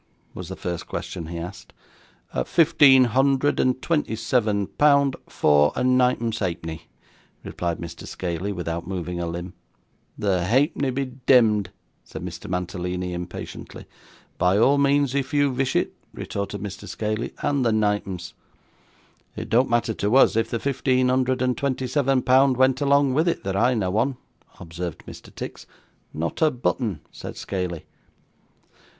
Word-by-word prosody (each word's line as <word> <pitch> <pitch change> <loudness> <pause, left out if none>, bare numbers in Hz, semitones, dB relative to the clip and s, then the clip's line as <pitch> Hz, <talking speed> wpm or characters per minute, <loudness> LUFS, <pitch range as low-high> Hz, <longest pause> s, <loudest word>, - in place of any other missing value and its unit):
was 90 -1 -8
the 95 - -5
first 85 -2 -5
question 80 - -5
he 85 +1 -6
asked. 90 +2 -8 0.7
'Fifteen 145 -5 +6
hundred 135 +3 +2
and 130 0 +1
twenty 150 -9 0
seven 110 -3 +1
pound, 140 +2 +3
four 75 0 +3
and 125 0 +2
ninepence 120 -3 +1
ha'penny,' 85 -4 -4 0.6
replied 85 -1 -3
Mr. 85 -1 -8
Scaley, 90 +2 -3
without 85 -2 -4
moving 90 -2 -4
a 85 - -2
limb. 85 +2 -5 0.6
'The 95 -4 0
halfpenny 135 - +2
be 135 +2 -1 0.2
demd,' 110 -6 +5 0.4
said 80 - -9
Mr. 85 -1 -7
Mantalini, 90 0 -3
impatiently. 90 0 -7 0.5
'By 90 +2 +3
all 135 +6 +4
means 140 -1 +2
if 140 0 -2
you 145 -2 +3
vish 130 0 -1
it,' - - +1 0.2
retorted 100 0 -4
Mr. 100 -1 -7
Scaley; 110 +2 -3
'and 140 -2 +1
the 115 - +2
ninepence.' 105 -4 -1 1.0
'It - - -5
don't 125 +3 +3
matter 120 -1 +1
to 105 +3 0
us 135 - +6
if 115 0 +1
the 115 - -1
fifteen 130 0 +1
hundred 130 0 +1
and 125 -1 +1
twenty 130 -2 -2
seven 135 0 +1
pound 130 0 +4
went 130 +1 +3
along 140 -1 +3
with 160 +5 +2
it, 170 - 0
that 95 0 -2
I 120 +5 +3
know 95 -3 -1
on,' 130 +3 +1 0.4
observed 85 0 -6
Mr. - - -11
Tix. - - -8 0.4
'Not 80 - -4
a 160 - +5
button,' 120 - -2
said - - -8
Scaley. 90 -4 -4
115 Hz, 150 wpm, -24 LUFS, 90-130 Hz, 1.0 s, Fifteen